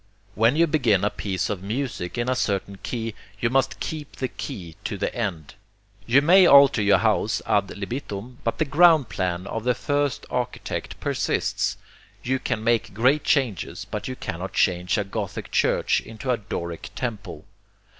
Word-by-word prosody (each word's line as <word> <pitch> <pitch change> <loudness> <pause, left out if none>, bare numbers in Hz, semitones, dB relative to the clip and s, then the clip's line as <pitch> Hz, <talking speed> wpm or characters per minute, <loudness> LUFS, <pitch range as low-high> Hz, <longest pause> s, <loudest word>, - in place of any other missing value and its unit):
When 115 +6 +3
you 165 +2 +5
begin 120 - +2
a 105 - +2
piece 95 -2 -2
of 100 -4 -3
music 110 -3 -3
in 120 +1 -1
a 130 - +1
certain 100 -4 -2
key, 115 -2 -4 0.3
you 115 - 0
must 135 0 +1
keep 150 -2 -5
the 130 - -3
key 90 -6 -7
to - - -3
the - - -2
end. 80 -3 -4 0.5
You 135 +4 +5
may 180 +3 +7
alter 140 -4 +7
your 100 -1 +5
house 110 +1 +1
ad 100 -1 +2
libitum, 115 +2 -6
but 115 - -1
the 155 - +1
ground 155 -2 +5
plan 90 -1 -2
of 110 +2 -4
the 125 0 +2
first 145 +1 -1
architect 125 -1 -4
persists - - -1 0.5
you 130 +2 0
can 115 -4 -2
make 115 -3 +1
great 130 +7 +3
changes, 100 - 0
but 105 +1 -5
you 130 - -4
cannot 90 -4 -5
change 90 0 +1
a 105 - +1
Gothic 100 0 -5
church - - +2
into 115 +4 -4
a 125 - +2
Doric 85 -5 -5
temple. 105 -10 -5
115 Hz, 170 wpm, -24 LUFS, 100-130 Hz, 0.5 s, may